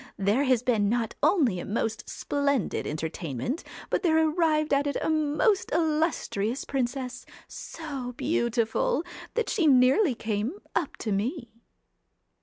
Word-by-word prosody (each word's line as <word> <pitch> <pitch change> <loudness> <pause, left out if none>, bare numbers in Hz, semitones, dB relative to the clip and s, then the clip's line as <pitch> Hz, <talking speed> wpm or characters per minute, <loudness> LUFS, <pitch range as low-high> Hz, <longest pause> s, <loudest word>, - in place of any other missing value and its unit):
There 205 +8 +2
has 255 -3 +2
been 220 -5 +2
not 230 -1 0
only 260 - +3
a - - -5
most 220 +1 -2
splendid 280 -6 -1
entertainment, 155 - -3 0.3
but - - +1
there 320 -4 +3
arrived 315 -1 +2
at 280 +1 +2
it 285 - -1
a - - 0
most 315 +7 +1
illustrious 305 - 0
princess, 255 -1 -3 0.2
so 275 -6 -6
beautiful, 240 0 0 0.3
that 470 - 0
she 350 -8 +2
nearly 265 - +5
came 220 +4 -2 0.2
up 335 -4 -1
to 215 - 0
me.' 235 - -2
260 Hz, 130 wpm, -27 LUFS, 225-310 Hz, 0.3 s, nearly